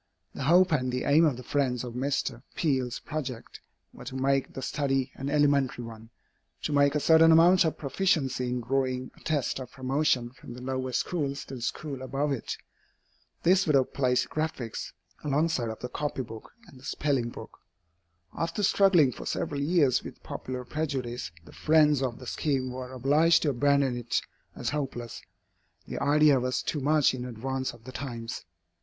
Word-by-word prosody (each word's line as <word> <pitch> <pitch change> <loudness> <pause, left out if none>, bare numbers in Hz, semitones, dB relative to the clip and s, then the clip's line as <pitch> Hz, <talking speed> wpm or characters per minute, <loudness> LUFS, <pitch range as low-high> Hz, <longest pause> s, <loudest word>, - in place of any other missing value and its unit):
The 135 - -4
hope 180 +4 +5
and 130 -4 +1
the 125 0 -2
aim 155 +4 +5
of 140 -6 +1
the 125 - -8
friends 125 -2 0
of 120 -2 -6
Mr. 130 -1 -2
Peale's 130 -6 0
project 130 -6 -6 0.3
were - - -11
to 130 +1 -6
make 135 0 +1
the 135 - -5
study 135 -2 0
an 135 +1 -5
elementary 140 -4 +2
one 115 -1 -10 0.5
to 150 - -1
make 140 0 +4
a - - +3
certain 165 +2 +6
amount 175 +3 +6
of 160 - -1
proficiency 135 -5 0
in 125 0 -2
drawing 130 +1 -1
a - - -19
test 145 -4 -1
of 130 -2 -7
promotion 130 -2 0
from 125 -1 -11
the 125 - -9
lower 130 0 -2
schools 140 +1 -2
to 135 - -8
the - - -10
schools 135 +3 -4
above 135 +3 -1
it. 130 -5 -3 0.9
This 185 +1 +4
would 150 - +4
have 130 -2 +2
placed 125 -2 +1
"Graphics" 155 -7 -3 0.3
alongside 145 -4 +1
of 110 - -7
the 125 - -3
copy 140 +1 -3
book 110 -2 -10 0.2
and 130 - -15
the - - -18
spelling 135 -4 0
book. - - -11 0.8
After 170 +5 -2
struggling 185 -8 +5
for - - -8
several 145 -1 -2
years 145 -4 +3
with - - -10
popular 125 -1 -6
prejudice, 130 -5 -3 0.2
the 75 - -14
friends 150 -3 +4
of 125 -3 -2
the 125 - -11
scheme 130 -1 -1
were 125 0 -6
obliged 145 +6 +3
to 150 - +2
abandon 140 0 +2
it 120 -1 -1 0.4
as - - -3
hopeless. 135 -5 -4 0.6
The - - -5
idea 145 -1 +5
was 125 +1 -1
too 150 - -2
much 150 0 +3
in 125 -1 -4
advance 130 +2 -3
of 115 - -17
the 130 - -9
times. 120 -7 -6
135 Hz, 180 wpm, -28 LUFS, 125-150 Hz, 0.9 s, certain